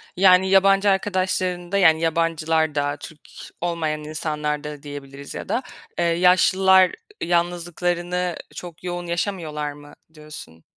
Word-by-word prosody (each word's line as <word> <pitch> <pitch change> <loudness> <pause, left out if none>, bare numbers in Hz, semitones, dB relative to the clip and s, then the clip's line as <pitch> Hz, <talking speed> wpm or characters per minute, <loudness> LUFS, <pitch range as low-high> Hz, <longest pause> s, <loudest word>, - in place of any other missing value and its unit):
Yani, 190 0 +5
yabancı 195 +1 +4
arkadaşlarında, 185 -1 -1
yani, 160 -4 +5
yabancılarda, 160 -3 0
Türk 155 0 -11 0.4
olmayan 160 -3 -2
insanlarda 150 -1 -4
diyebiliriz 140 -1 -9
ya - - -7
da, 255 - 0 0.4
eee, 170 - +2
yaşlılar 185 +2 +4 0.3
yalnızlıklarını 175 +1 -1 0.2
çok 175 -2 -10
yoğun 175 -1 -4
yaşamıyorlar 170 -4 -3
mı 145 0 -14 0.2
diyorsun? 150 - -11
170 Hz, 105 wpm, -22 LUFS, 150-180 Hz, 0.4 s, Yani